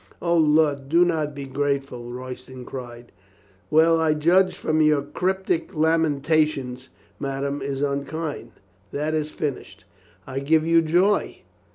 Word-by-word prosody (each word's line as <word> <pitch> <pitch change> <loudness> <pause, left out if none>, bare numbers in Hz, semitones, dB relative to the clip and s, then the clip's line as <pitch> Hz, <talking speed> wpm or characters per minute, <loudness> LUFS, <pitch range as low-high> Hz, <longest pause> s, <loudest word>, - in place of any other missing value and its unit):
"O, 170 0 +1
lud, 150 -3 +3
do 170 +3 +5
not 155 -4 -1
be 140 -1 -6
grateful," 135 -3 -2
Royston 125 0 -8
cried. 120 -2 -9 0.6
"Well, 165 +1 +4
I 160 -1 +2
judge 180 +5 +3
from 155 0 0
your 150 -2 +3
cryptic 185 +1 -2
lamentations 155 -4 +1 0.3
ma 135 -1 -3
dame 140 0 -2
is 135 0 -3
unkind?" 140 -2 -3 0.4
"That 150 +2 -2
is 155 -1 -1
finished." 125 -11 -5 0.4
"I 135 0 -4
give 155 +3 +2
you 165 0 +4
joy. 175 +6 +1
150 Hz, 135 wpm, -23 LUFS, 135-160 Hz, 0.6 s, do